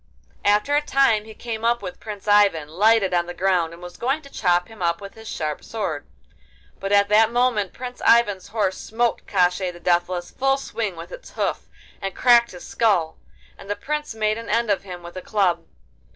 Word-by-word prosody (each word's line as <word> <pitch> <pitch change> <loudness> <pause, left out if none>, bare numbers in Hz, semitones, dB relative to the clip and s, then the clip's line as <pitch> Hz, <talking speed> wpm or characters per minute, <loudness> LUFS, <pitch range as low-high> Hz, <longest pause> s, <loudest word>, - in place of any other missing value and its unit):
After 210 +8 +3
a 295 - +4
time 270 -7 +2
he 220 -1 -11
came 225 -2 -5
up 235 -1 +1
with 180 -2 -7
Prince 210 -2 -8
Ivan, 200 -7 +4
lighted 200 +4 +3
on 175 -1 +1
the 175 - -7
ground, 180 -3 +1
and 170 +1 -12
was 175 0 -9
going 270 +6 -1
to 280 - -14
chop 175 -2 +1
him 225 -3 -14
up 170 -1 +1
with 200 -1 -9
his 220 0 -12
sharp 155 -5 -4
sword. 175 -10 -4 0.7
But 195 - -4
at 200 0 +5
that 220 +2 +5
moment 240 -5 +1
Prince 250 0 -8
Ivan's 210 -5 +4
horse 200 -3 -1
smote 235 +1 -1
Koshchei 180 -1 +2
the 175 -1 -10
Deathless 175 0 0
full 270 +1 +1
swing 220 -8 -4
with 165 - -9
its - - -11
hoof, - - -2 0.3
and 195 -1 -4
cracked 235 -1 +5
his 180 - -11
skull, 185 -8 +1 0.4
and 195 - -12
the 205 - 0
Prince 300 -2 -4
made 215 0 0
an 230 - -8
end 230 0 +1
of 200 - +1
him 180 -3 -9
with 175 +1 -10
a - - -4
club. 195 -3 0
205 Hz, 205 wpm, -23 LUFS, 180-230 Hz, 0.7 s, at